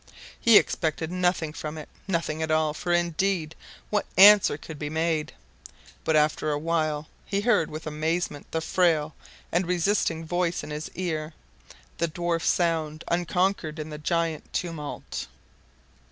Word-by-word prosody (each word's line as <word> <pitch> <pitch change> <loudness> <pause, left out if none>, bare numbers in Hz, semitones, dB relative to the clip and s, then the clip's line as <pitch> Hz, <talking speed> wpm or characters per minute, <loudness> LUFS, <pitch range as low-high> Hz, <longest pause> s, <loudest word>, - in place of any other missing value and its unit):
He 230 -2 +7
expected 160 0 0
nothing 180 -4 0
from 155 -1 -6
it. 155 - -8 0.2
Nothing 165 -4 -1
at 160 - -1
all. 155 -1 +2
For 175 +3 -3
indeed 175 -1 +1 0.4
what 210 -1 0
answer 200 -5 +8
could 155 -1 -10
be 150 - -3
made? 160 0 0 0.7
But 160 - +1
after 155 0 +2
a 145 - 0
while 155 -1 -1 0.2
he 200 0 -1
heard 210 -7 +2
with 155 +1 -7
amazement 155 0 -2
the 160 - -2
frail 160 -4 +2 0.4
and 175 +1 +1
resisting 175 -2 +1
voice 175 +1 -1
in - - -7
his 150 +1 -5
ear, 160 -3 -3 0.6
the 170 - +2
dwarf 170 +1 -1
sound, 160 -3 0
unconquered 175 -1 0
in 155 0 -6
the 150 - -6
giant 165 0 -1
tumult. 165 -4 -4
160 Hz, 145 wpm, -26 LUFS, 155-175 Hz, 0.7 s, answer